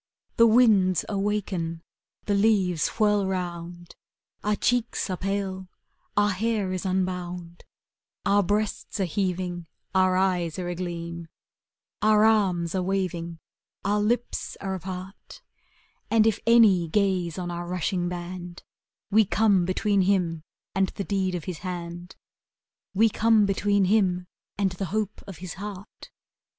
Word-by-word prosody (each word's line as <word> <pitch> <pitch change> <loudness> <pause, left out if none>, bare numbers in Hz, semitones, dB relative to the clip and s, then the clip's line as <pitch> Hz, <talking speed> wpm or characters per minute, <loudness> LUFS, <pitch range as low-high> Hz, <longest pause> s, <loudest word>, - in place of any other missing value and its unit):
The 230 - +7
winds 215 -6 +4
awaken, 195 -5 -2 0.4
the 205 - 0
leaves 200 -5 +2
whirl 210 -2 +3
rou?id, 175 -2 -5 0.5
Our 210 0 +1
cheeks 235 -2 0
are 185 - -2
pale, 190 -1 -3 0.5
our 205 0 +4
hair 205 0 -1
is 185 +1 -3
unbound, 180 -2 -3 0.6
Our 200 +1 +4
breasts 205 +2 -2
are 195 - +2
heaving, 180 -1 -2 0.3
our 185 -1 +3
eyes 180 -4 +1
are 180 -1 -3
a - - -2
gleam, 170 -1 -5 0.7
Our 215 0 +5
arms 185 -6 +2
are 190 - 0
waving, 180 -3 -2 0.5
our 205 +1 +2
lips 235 +3 -1
are 195 -1 -3
apart; 185 +1 -8 0.7
And 225 -1 +4
if 225 -1 +2
any 215 -7 +6
gaze 185 -2 0
on 175 -1 -3
our 175 0 -5
rushing 180 0 -1
band, 175 0 -7 0.5
We 220 +2 +6
come 200 -2 +3
between 200 +2 +1
him 180 -4 +1 0.3
and 195 0 +2
the 200 - -5
deed 190 -2 -1
of 170 - -4
his 175 -2 -5
hand, 175 -1 -6 0.8
We 225 +4 +5
come 220 0 +3
between 200 0 +2
him 185 -3 +2 0.3
and 195 -2 +1
the 185 +2 -4
hope 210 +3 -3
of 195 -5 -8
his 180 +1 -7
heart.'' 200 -1 -9
190 Hz, 135 wpm, -26 LUFS, 175-205 Hz, 0.8 s, The